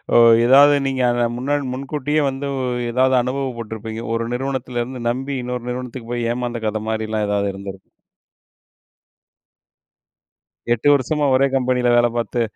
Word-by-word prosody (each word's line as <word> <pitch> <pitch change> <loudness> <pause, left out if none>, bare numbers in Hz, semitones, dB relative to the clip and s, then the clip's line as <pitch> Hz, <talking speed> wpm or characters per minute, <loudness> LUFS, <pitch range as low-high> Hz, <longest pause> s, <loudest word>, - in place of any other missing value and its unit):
ஓ - - +8 0.3
ஏதாவது 140 +4 +7
நீங்க 130 -1 -1
அத 120 0 +1
முன்னா 135 +4 -2 0.2
முன்கூட்டியே 145 +3 -2
வந்து 135 +1 -5
ஓ - - -2 0.3
ஏதாவது 130 +2 +3
அனுபவ 135 +2 -2
பட்டுருப்பீங்க. 110 0 -6
ஒரு 115 0 -2
நிறுவனத்துல 130 -1 -3
இருந்து 125 +1 -8
நம்பி, 135 +3 -3
இன்னொரு 125 0 -4
நிறுவனத்துக்கு 125 -1 -6
போயி 120 -1 -1
ஏமாந்த 120 -1 -4
கதை 110 0 -2
மாரிலாம் 110 -1 -2
ஏதாவது 100 -1 0
இருந்திருக்கும். 95 0 -9 2.8
8 120 +4 -1
வருஷமா 145 +2 0
ஒரே 135 +1 +4
கம்பெனியில 125 -1 +1
வேலை 120 0 +4
பார்த்து, 120 +1 -1
125 Hz, 140 wpm, -20 LUFS, 115-135 Hz, 2.8 s, ஓ